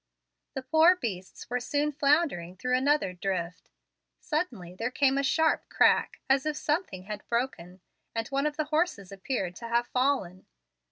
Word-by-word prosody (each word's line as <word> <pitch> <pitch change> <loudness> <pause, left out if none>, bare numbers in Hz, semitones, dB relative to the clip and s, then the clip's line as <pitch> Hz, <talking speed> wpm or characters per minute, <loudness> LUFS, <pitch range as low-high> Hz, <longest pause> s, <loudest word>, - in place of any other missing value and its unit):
The 265 - -4
poor 320 +6 +5
beasts 190 - -6
were 245 +1 -1
soon 290 +4 0
floundering 280 - +1
through 250 +5 0
another 270 -6 +2
drift. 180 -1 -4 0.5
Suddenly 245 - -3
there 225 +6 -2
came 270 +1 +2
a 275 - +2
sharp 320 +4 +1
crack, - - +3
as 270 -1 +3
if 300 -1 -1
something 300 - -2
had 210 +2 -6
broken, 195 -7 -3 0.3
and 225 -1 -2
one 275 +2 +1
of 300 0 -4
the 310 - +1
horses 305 - -1
appeared 195 -2 -3
to 235 - -7
have 235 +1 +1
fallen. 250 -10 -1
255 Hz, 160 wpm, -28 LUFS, 190-295 Hz, 0.5 s, poor